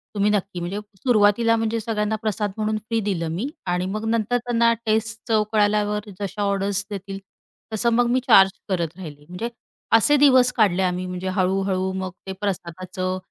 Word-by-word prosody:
तुम्ही 205 Hz, +1 st, +2 dB
नक्की" 195 Hz, -3 st, -1 dB
म्हणजे 180 Hz, +4 st, -3 dB, 0.2 s
सुरुवातीला 230 Hz, 0 st, +3 dB
म्हणजे 225 Hz, 0 st, -1 dB
सगळ्यांना 215 Hz, -1 st, -1 dB
प्रसाद 210 Hz, -1 st, -1 dB
म्हणून 215 Hz, 0 st, 0 dB
फ्री 225 Hz, +2 st, -2 dB
दिलं 170 Hz, -5 st, -1 dB
मी 230 Hz, +10 st, -2 dB, 0.2 s
आणि 180 Hz, 0 st, -1 dB
मग 215 Hz, +1 st, -3 dB
नंतर 230 Hz, +1 st, +1 dB
त्यांना 235 Hz, -1 st, +2 dB
टेस्ट 220 Hz, +1 st, 0 dB
चव 215 Hz, -1 st, +3 dB
कळाल्यावर 210 Hz, 0 st, +1 dB
जशा 200 Hz, +1 st, -4 dB
ऑर्डर्स 200 Hz, 0 st, 0 dB
देतील 195 Hz, -1 st, -6 dB, 0.5 s
तसं 235 Hz, +2 st, +2 dB
मग 240 Hz, 0 st, +3 dB
मी 255 Hz, -, +3 dB
चार्ज 195 Hz, -4 st, +7 dB, 0.2 s
करत 170 Hz, -3 st, -1 dB
राहिले. 150 Hz, -5 st, -10 dB
म्हणजे 180 Hz, +7 st, -4 dB, 0.5 s
असे 290 Hz, +6 st, +4 dB
दिवस 260 Hz, -3 st, +5 dB
काढले 195 Hz, -5 st, +2 dB
आम्ही 180 Hz, 0 st, -1 dB
म्हणजे 180 Hz, +1 st, -5 dB
हळू-हळू 190 Hz, 0 st, 0 dB
मग 185 Hz, -, -4 dB, 0.2 s
ते -, -, -3 dB
प्रसादाचं 185 Hz, -1 st, -3 dB
205 Hz, 165 wpm, -23 LUFS, 185-225 Hz, 0.5 s, चार्ज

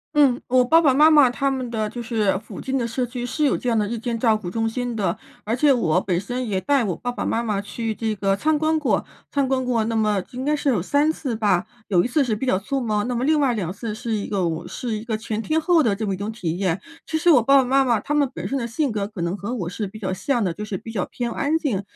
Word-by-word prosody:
嗯， 275 Hz, -4 st, +4 dB
我 255 Hz, 0 st, +4 dB
爸 325 Hz, +6 st, +5 dB
爸 285 Hz, -5 st, +4 dB
妈 300 Hz, +4 st, +6 dB
妈 295 Hz, -5 st, +6 dB
他 275 Hz, +3 st, 0 dB
们 260 Hz, -2 st, -3 dB
的 215 Hz, -2 st, -1 dB
就 240 Hz, +2 st, -6 dB
是 220 Hz, -5 st, +1 dB
附 215 Hz, -, -10 dB
近 265 Hz, +1 st, -2 dB
的 245 Hz, -, 0 dB
社 235 Hz, +2 st, -1 dB
区 245 Hz, 0 st, -5 dB
是 300 Hz, +5 st, 0 dB
有 280 Hz, -, +3 dB
这 250 Hz, -, -2 dB
样 230 Hz, -2 st, +2 dB
的 210 Hz, -, 0 dB
日 235 Hz, +3 st, -3 dB
间 230 Hz, 0 st, -3 dB
照 225 Hz, -2 st, +3 dB
顾 185 Hz, -5 st, -5 dB
中 225 Hz, +2 st, 0 dB
心 245 Hz, +1 st, -3 dB
的， 200 Hz, -4 st, -1 dB, 0.3 s
而 220 Hz, +2 st, 0 dB
且 285 Hz, +3 st, +4 dB
我 180 Hz, -9 st, +2 dB
本 180 Hz, -3 st, 0 dB
身 245 Hz, +6 st, -4 dB
也 190 Hz, -2 st, 0 dB
带 275 Hz, +7 st, +2 dB
我 195 Hz, -5 st, -1 dB
爸 245 Hz, -, -4 dB
爸 -, -, -4 dB
妈 230 Hz, -, 0 dB
妈 210 Hz, -4 st, -1 dB
去 220 Hz, +2 st, -4 dB
这 220 Hz, 0 st, -1 dB
个 195 Hz, -1 st, +1 dB
参 305 Hz, +8 st, +1 dB
观 315 Hz, +1 st, +2 dB
过， 255 Hz, -11 st, 0 dB, 0.3 s
参 280 Hz, -2 st, +1 dB
观 260 Hz, 0 st, 0 dB
过 240 Hz, -3 st, 0 dB
那 225 Hz, 0 st, -2 dB
么 210 Hz, -3 st, +2 dB
应 255 Hz, +1 st, -5 dB
该 295 Hz, +2 st, +1 dB
是 295 Hz, 0 st, -2 dB
有 235 Hz, -10 st, +2 dB
3 285 Hz, -, +2 dB
次 270 Hz, -6 st, -4 dB
吧。 205 Hz, -4 st, +1 dB, 0.2 s
有 175 Hz, -4 st, +3 dB
1 -, -, 0 dB
次 280 Hz, +2 st, +2 dB
是 225 Hz, -3 st, 0 dB
比 220 Hz, -, -3 dB
较 190 Hz, -7 st, +2 dB
匆 270 Hz, +7 st, -2 dB
忙， 215 Hz, -2 st, 0 dB
那 250 Hz, -, -2 dB
么 240 Hz, -, -1 dB
另 305 Hz, +2 st, +3 dB
外 270 Hz, -4 st, +2 dB
2 190 Hz, -7 st, -2 dB
次 210 Hz, +2 st, -5 dB
是 230 Hz, +1 st, -5 dB
一 210 Hz, -2 st, -1 dB
个 200 Hz, -, -2 dB
哦， 170 Hz, -2 st, -1 dB
是 225 Hz, +5 st, -4 dB
一 215 Hz, -, -8 dB
个 220 Hz, -2 st, -1 dB
全 220 Hz, 0 st, -3 dB
天 310 Hz, +7 st, 0 dB
候 340 Hz, 0 st, +4 dB
的 220 Hz, -8 st, +2 dB
这 215 Hz, +2 st, -3 dB
么 195 Hz, -, -1 dB
一 -, -, -4 dB
种 200 Hz, +3 st, -4 dB
体 175 Hz, -7 st, -3 dB
验。 185 Hz, -2 st, -1 dB, 0.2 s
其 320 Hz, -, -1 dB
实 345 Hz, +2 st, +2 dB
我 275 Hz, -7 st, +7 dB
爸 275 Hz, +5 st, +4 dB
爸 270 Hz, -, +5 dB
妈 270 Hz, +2 st, +3 dB
妈 240 Hz, -3 st, +3 dB
他 295 Hz, -, -3 dB
们 290 Hz, -3 st, +2 dB
本 -, -, -5 dB
身 275 Hz, -, -1 dB
的 235 Hz, -3 st, -2 dB
性 260 Hz, +4 st, -1 dB
格 205 Hz, -2 st, -2 dB
可 210 Hz, -4 st, -8 dB
能 170 Hz, +3 st, -1 dB
和 215 Hz, +5 st, -4 dB
我 180 Hz, -8 st, -3 dB
是 205 Hz, +3 st, -4 dB
比 195 Hz, -, -10 dB
较 195 Hz, -3 st, -3 dB
像 240 Hz, +5 st, 0 dB
的， 180 Hz, -4 st, 0 dB
就 210 Hz, +5 st, -6 dB
是 200 Hz, -2 st, -4 dB
比 225 Hz, -, -9 dB
较 200 Hz, -5 st, -1 dB
偏 240 Hz, -1 st, -4 dB
安 290 Hz, +6 st, 0 dB
静， 255 Hz, -12 st, -1 dB
230 Hz, 315 characters per minute, -23 LUFS, 205-265 Hz, 0.3 s, 我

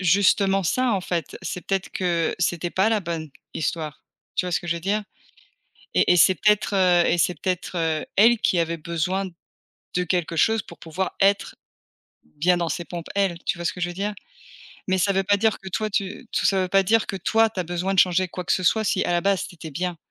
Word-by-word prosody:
justement 195 Hz, +1 st, +3 dB
ça, 250 Hz, +7 st, +1 dB
en 195 Hz, -, 0 dB
fait. 175 Hz, -4 st, -3 dB
C'est 180 Hz, -, -5 dB
peut-être 195 Hz, -1 st, -1 dB
que, 170 Hz, -3 st, 0 dB
c'était 175 Hz, -1 st, -1 dB
pas 190 Hz, +3 st, +2 dB
la 220 Hz, -, +2 dB
bonne 165 Hz, -4 st, -5 dB, 0.2 s
histoire, 155 Hz, -2 st, -3 dB, 0.3 s
tu -, -, 0 dB
vois 180 Hz, -, -3 dB
ce -, -, +1 dB
que 175 Hz, -, -9 dB
je 170 Hz, -, 0 dB
veux -, -, -6 dB
dire? 205 Hz, +4 st, 0 dB, 0.9 s
Et -, -, +4 dB
et 180 Hz, -, +3 dB
c'est 185 Hz, +3 st, +6 dB
peut-être, 210 Hz, +2 st, +2 dB
heu, 180 Hz, -2 st, +4 dB
et 175 Hz, -, +2 dB
c'est 175 Hz, +2 st, +2 dB
peut-être, 185 Hz, 0 st, -3 dB
heu, 160 Hz, -2 st, 0 dB
elle 230 Hz, +3 st, +6 dB
qui 175 Hz, -, +2 dB
avait 165 Hz, 0 st, -1 dB
besoin 170 Hz, +4 st, -2 dB, 0.7 s
de 180 Hz, 0 st, +1 dB
quelque 170 Hz, -1 st, -1 dB
chose 220 Hz, +6 st, +3 dB
pour -, -, -14 dB
pouvoir 170 Hz, +4 st, -4 dB
être 200 Hz, +1 st, +2 dB, 0.7 s
bien 165 Hz, -, 0 dB
dans 170 Hz, -1 st, -1 dB
ses 170 Hz, +3 st, -3 dB
pompes, 170 Hz, -1 st, -7 dB
elle, 195 Hz, -4 st, +1 dB
tu -, -, -1 dB
vois 170 Hz, -, -6 dB
ce -, -, 0 dB
que 180 Hz, -, -10 dB
je 175 Hz, -, 0 dB
veux 175 Hz, -, -7 dB
dire? 205 Hz, +3 st, -3 dB, 0.7 s
Mais 190 Hz, 0 st, +2 dB
ça 195 Hz, +2 st, +2 dB
veut 195 Hz, 0 st, +1 dB
pas 205 Hz, +1 st, +3 dB
dire 220 Hz, +1 st, +1 dB
que 190 Hz, -, -11 dB
toi, 215 Hz, +3 st, -2 dB
tu 200 Hz, +3 st, -3 dB
tout -, -, 0 dB
ça 190 Hz, -1 st, +3 dB
veut 185 Hz, -, -1 dB
pas 195 Hz, +1 st, +4 dB
dire 225 Hz, +3 st, +3 dB
que 195 Hz, -, -4 dB
toi, 225 Hz, +4 st, +2 dB
tu 200 Hz, -, -7 dB
as -, -, 0 dB
besoin 175 Hz, +3 st, -2 dB
de 190 Hz, -, +3 dB
changer 185 Hz, 0 st, +3 dB
quoi 180 Hz, 0 st, -6 dB
que -, -, +2 dB
ce 185 Hz, -, -1 dB
soit, 220 Hz, +5 st, +3 dB
si, -, -, +1 dB
à -, -, -1 dB
la 175 Hz, 0 st, +2 dB
base, 195 Hz, -2 st, +1 dB
tu 175 Hz, -, -14 dB
était 160 Hz, -2 st, -9 dB
bien. 175 Hz, +2 st, -3 dB
180 Hz, 240 wpm, -23 LUFS, 170-195 Hz, 0.9 s, c'est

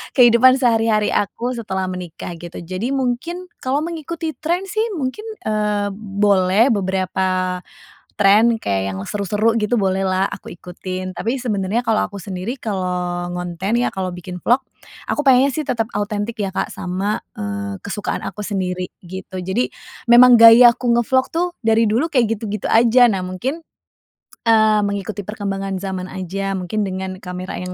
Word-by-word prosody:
kehidupan 250 Hz, 0 st, +7 dB
sehari-hari 225 Hz, -4 st, +2 dB
aku 230 Hz, +4 st, -1 dB
setelah 205 Hz, -6 st, -3 dB
menikah 180 Hz, -1 st, -7 dB
gitu. 175 Hz, 0 st, -10 dB
Jadi 185 Hz, +6 st, -4 dB
mungkin, 330 Hz, +8 st, -3 dB
kalau 275 Hz, +3 st, -1 dB
mengikuti 330 Hz, 0 st, -4 dB
trend 345 Hz, +5 st, -1 dB
sih 435 Hz, -, 0 dB
mungkin, 290 Hz, +8 st, -4 dB, 0.2 s
eee, 210 Hz, -1 st, 0 dB
boleh 200 Hz, +2 st, +2 dB
beberapa 185 Hz, -2 st, 0 dB, 0.6 s
trend 210 Hz, +3 st, +4 dB
kayak 95 Hz, -1 st, -1 dB
yang -, -, -5 dB
seru-seru 210 Hz, +3 st, 0 dB
gitu, 210 Hz, +3 st, 0 dB
bolehlah 190 Hz, 0 st, +1 dB
aku -, -, -8 dB
ikutin. 185 Hz, +1 st, -6 dB
Tapi 230 Hz, +4 st, -1 dB
sebenarnya 210 Hz, -1 st, -1 dB
kalau 225 Hz, -1 st, +2 dB
aku 200 Hz, -, -13 dB
sendiri, 190 Hz, +6 st, -5 dB
kalau 180 Hz, -3 st, -2 dB
ngonten 180 Hz, +6 st, -2 dB
ya, -, -, 0 dB
kalau 185 Hz, -1 st, -3 dB
bikin 180 Hz, 0 st, -8 dB
vlog, 250 Hz, +3 st, +2 dB, 0.5 s
aku -, -, -2 dB
pengennya 265 Hz, +1 st, +5 dB
sih 310 Hz, -, -2 dB
tetap 225 Hz, -2 st, 0 dB
autentik 205 Hz, +2 st, -3 dB
ya 195 Hz, -2 st, -1 dB
Kak -, -, -1 dB
sama, 190 Hz, +3 st, -2 dB, 0.2 s
eee, 100 Hz, -1 st, -4 dB
kesukaan 205 Hz, +1 st, -4 dB
aku -, -, -6 dB
sendiri, 185 Hz, -3 st, -2 dB, 0.2 s
gitu. 190 Hz, +1 st, -8 dB
Jadi, 190 Hz, +7 st, -1 dB, 0.4 s
memang 240 Hz, 0 st, +8 dB
gaya 230 Hz, +1 st, +9 dB
aku 250 Hz, -, -4 dB
nge-vlog 260 Hz, +2 st, +2 dB
tuh, 345 Hz, +2 st, +1 dB, 0.2 s
dari 225 Hz, 0 st, +4 dB
dulu 240 Hz, +9 st, +1 dB
kayak 225 Hz, -5 st, +1 dB
gitu-gitu 210 Hz, -2 st, -4 dB
aja. 240 Hz, +2 st, +6 dB
Nah 195 Hz, -, -1 dB
mungkin, 240 Hz, -, -3 dB, 0.9 s
eee, 220 Hz, -1 st, +5 dB
mengikuti 200 Hz, 0 st, -3 dB
perkembangan 195 Hz, -2 st, -3 dB
zaman 190 Hz, -2 st, -4 dB
aja, 195 Hz, +1 st, -4 dB
mungkin 190 Hz, +4 st, -2 dB
dengan 185 Hz, 0 st, -5 dB
kamera 180 Hz, 0 st, -6 dB
yang 180 Hz, 0 st, -5 dB
205 Hz, 150 wpm, -20 LUFS, 185-235 Hz, 0.9 s, gaya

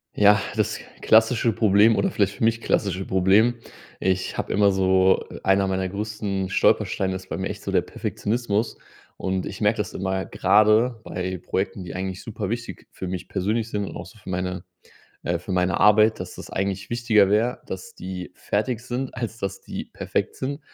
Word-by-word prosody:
Ja, 105 Hz, 0 st, +6 dB
das -, -, 0 dB, 0.2 s
klassische 115 Hz, +1 st, +4 dB
Problem 105 Hz, +1 st, +5 dB
oder 195 Hz, -, +1 dB
vielleicht 100 Hz, -, +1 dB
für -, -, -5 dB
mich 115 Hz, +1 st, +2 dB
klassische 95 Hz, -2 st, 0 dB
Problem. 95 Hz, +6 st, +4 dB, 0.4 s
Ich 95 Hz, 0 st, -1 dB
habe -, -, -3 dB
immer 100 Hz, 0 st, +4 dB
so, 95 Hz, 0 st, +3 dB
äh -, -, -9 dB
einer 95 Hz, 0 st, +3 dB
meiner 95 Hz, 0 st, -1 dB
größten 100 Hz, -2 st, -3 dB
Stolpersteine 95 Hz, 0 st, +2 dB
ist 95 Hz, 0 st, -8 dB
bei -, -, -3 dB
mir 95 Hz, -, -2 dB
echt -, -, -6 dB
so -, -, -3 dB
der -, -, +3 dB
Perfektionismus 110 Hz, 0 st, -2 dB, 0.4 s
und 95 Hz, -1 st, -2 dB
ich -, -, -7 dB
merke 105 Hz, +1 st, +3 dB
das 105 Hz, -4 st, -3 dB
immer 95 Hz, 0 st, -2 dB
grade 110 Hz, +4 st, +3 dB
bei 90 Hz, 0 st, -4 dB
Projekten, 95 Hz, 0 st, -2 dB
die 90 Hz, -, -7 dB
eigentlich 95 Hz, 0 st, -4 dB
super 110 Hz, -3 st, -4 dB
wichtig 115 Hz, +1 st, -5 dB
für 95 Hz, -, -6 dB
mich 90 Hz, 0 st, -5 dB
persönlich 105 Hz, +4 st, -1 dB
sind 105 Hz, -2 st, -2 dB
und -, -, -8 dB
auch -, -, -6 dB
so 115 Hz, -, -16 dB
für 100 Hz, -, -11 dB
meine 90 Hz, -1 st, -3 dB, 0.6 s
äh, 85 Hz, 0 st, 0 dB
für 95 Hz, -, -5 dB
meine 90 Hz, -1 st, +1 dB
Arbeit, 105 Hz, +1 st, +5 dB
dass -, -, -6 dB
das -, -, -9 dB
eigentlich 95 Hz, 0 st, -2 dB
wichtiger 115 Hz, -4 st, +4 dB
wäre, 110 Hz, +5 st, +1 dB
dass 95 Hz, -1 st, -7 dB
die 90 Hz, -1 st, -6 dB
fertig 110 Hz, +3 st, -1 dB
sind, 125 Hz, +2 st, -4 dB
als 115 Hz, -2 st, -4 dB
dass 100 Hz, -, -4 dB
die -, -, -6 dB
perfekt -, -, -3 dB
sind. 140 Hz, +3 st, -4 dB
100 Hz, 190 wpm, -24 LUFS, 95-110 Hz, 0.6 s, Ja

